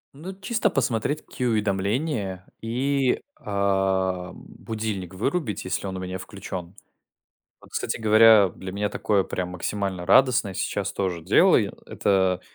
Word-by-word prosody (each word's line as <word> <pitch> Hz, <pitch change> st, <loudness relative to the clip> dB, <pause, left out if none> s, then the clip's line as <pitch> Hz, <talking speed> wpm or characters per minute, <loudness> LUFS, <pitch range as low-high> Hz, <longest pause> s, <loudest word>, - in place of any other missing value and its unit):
Ну 165 Hz, +7 st, -7 dB
чисто 220 Hz, +1 st, +1 dB
посмотреть 140 Hz, -, -1 dB
какие 125 Hz, -3 st, -3 dB
уведомления 105 Hz, -, -1 dB, 0.2 s
и, 130 Hz, +3 st, 0 dB, 0.2 s
а, 95 Hz, -2 st, 0 dB
будильник 105 Hz, -5 st, -6 dB
вырубить, 135 Hz, -, -2 dB
если 95 Hz, +1 st, -2 dB
он 95 Hz, -1 st, -4 dB
у -, -, -5 dB
меня 95 Hz, 0 st, -5 dB
включен. 95 Hz, -2 st, -7 dB, 0.9 s
Вот, -, -, -18 dB
кстати -, -, -2 dB
говоря, 110 Hz, -2 st, +7 dB
для 95 Hz, +2 st, -8 dB
меня 105 Hz, +1 st, -1 dB
такое 100 Hz, -1 st, +1 dB
прям 90 Hz, -1 st, -4 dB
максимально 95 Hz, 0 st, -3 dB
радостное 110 Hz, 0 st, +4 dB
сейчас 95 Hz, +1 st, -2 dB
тоже 90 Hz, -4 st, -2 dB
делаю. -, -, +4 dB
Это 95 Hz, -2 st, +1 dB
100 Hz, 130 wpm, -25 LUFS, 95-115 Hz, 0.9 s, говоря